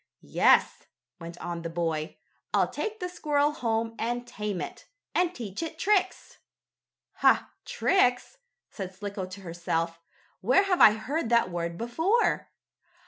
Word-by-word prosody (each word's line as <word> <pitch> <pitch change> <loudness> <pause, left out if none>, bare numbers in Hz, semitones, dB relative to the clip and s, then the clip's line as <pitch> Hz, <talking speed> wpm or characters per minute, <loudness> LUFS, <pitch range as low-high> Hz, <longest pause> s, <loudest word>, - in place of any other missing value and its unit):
"Yes," - - +3 0.3
went 170 0 -8
on 170 -1 -5
the 165 - -4
boy, 165 -2 -2 0.4
"I'll - - +3
take 435 0 -4
the 360 - -2
squirrel 295 -4 +1
home 230 -5 -1
and 240 +1 -2
tame 210 -4 -4
it, - - -7 0.3
and 355 -1 +2
teach 220 - -6
it 325 -1 -5
tricks." 380 0 0 0.8
"Ha! - - +3
Tricks!" 315 - +1 0.3
said 190 -2 -7
Slicko 200 -1 -5
to 185 +2 -10
herself. 165 -1 -2 0.4
"Where 255 - +4
have 380 -3 +1
I 210 - +9
heard 245 +5 -3
that 235 -6 +3
word 170 -1 -3
before? 325 - +1
225 Hz, 140 wpm, -28 LUFS, -, 0.8 s, I